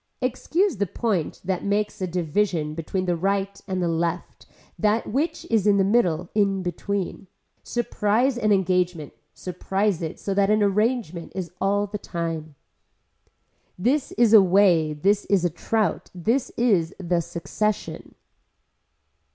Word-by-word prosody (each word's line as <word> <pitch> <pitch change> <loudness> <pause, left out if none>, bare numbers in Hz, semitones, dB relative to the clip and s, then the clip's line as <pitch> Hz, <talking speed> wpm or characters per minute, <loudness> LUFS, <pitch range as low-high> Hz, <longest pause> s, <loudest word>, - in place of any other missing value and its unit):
Excuse 290 - 0
the 200 0 0
point 195 -4 -2
that 185 -1 -1
makes 205 +1 -1
a 185 - 0
division 170 -2 -1
between 170 +4 -3
the 175 -1 +1
right 195 +3 -1
and 175 -4 -1
left 170 0 -3 0.3
that 215 +1 +2
which 285 +9 -2
is 215 -3 +3
in 205 -1 +5
the 195 - +4
middle 180 -5 +1
in 195 -3 +1
between. 190 +1 -3 0.3
Surprise 240 +2 0
an 215 -3 +1
engagement, 180 -5 +1 0.2
surprise 190 +1 -1
it 160 -2 -5
so 200 - -2
that 195 0 +2
an 215 0 +3
agreement 205 -4 0
is 180 -4 -4
all 200 +1 +2
the 205 0 -6
time. 165 -4 -4 1.2
This 255 +10 0
is 230 -2 +3
a 215 - +10
way, 180 -4 +4
this 200 +7 +1
is 190 -3 +2
a 175 - +1
trout, 220 +6 -1
this 230 +9 0
is 195 -9 +2
the 175 -2 0
succession. 210 +6 -3
195 Hz, 140 wpm, -24 LUFS, 175-210 Hz, 1.2 s, a